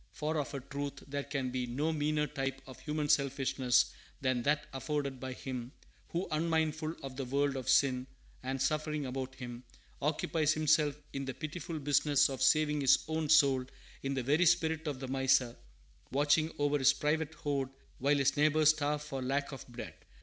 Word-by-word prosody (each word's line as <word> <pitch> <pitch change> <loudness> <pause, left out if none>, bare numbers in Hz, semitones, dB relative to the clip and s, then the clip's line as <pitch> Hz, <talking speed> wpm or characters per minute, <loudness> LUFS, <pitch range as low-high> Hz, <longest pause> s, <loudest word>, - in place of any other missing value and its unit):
For, 155 +1 -2
of 145 0 -4
a - - -2
truth, 140 +1 -5
there 140 0 -2
can 135 -3 -3
be 125 -1 -2
no 145 +7 -1
meaner 150 0 +1
type 135 -2 -3
of 130 - -11
human 150 -1 -2
selfishness 135 -3 +2 0.3
than 130 -2 0
that 145 +3 +1
afforded 140 -1 -2
by 130 0 -5
him 125 0 -6 0.4
who, 175 +3 -2
unmindful 160 0 0
of 135 -1 -7
the 135 - -3
world 140 +2 0
of 130 -1 -4
sin 130 -1 +3 0.3
and 130 +1 -3
suffering 150 +1 0
about 130 0 -4
him, 120 -1 -8 0.4
occupies 155 +1 +1
himself 155 -2 +3 0.2
in 135 0 -3
the 135 - -5
pitiful 165 +1 -5
business 145 0 +3
of 135 - -5
saving 150 -1 +3
his 135 - +4
own 160 -1 -2
soul, 140 -4 +5 0.4
in 135 0 -2
the 130 - -1
very 150 +7 +3
spirit 160 0 +2
of 140 -3 -3
the 130 - -5
miser, 130 -2 +2 0.6
watching 145 +3 +3
over 145 0 +1
his 135 - +5
private 155 +1 -1
hoard 140 -3 -2 0.3
while 145 +2 +3
his 135 -1 +2
neighbors 155 +1 +4
starve 150 -1 -1
for 135 -3 -5
lack 140 +3 -1
of 135 - -8
bread. 120 - -8
145 Hz, 180 wpm, -32 LUFS, 135-150 Hz, 0.6 s, soul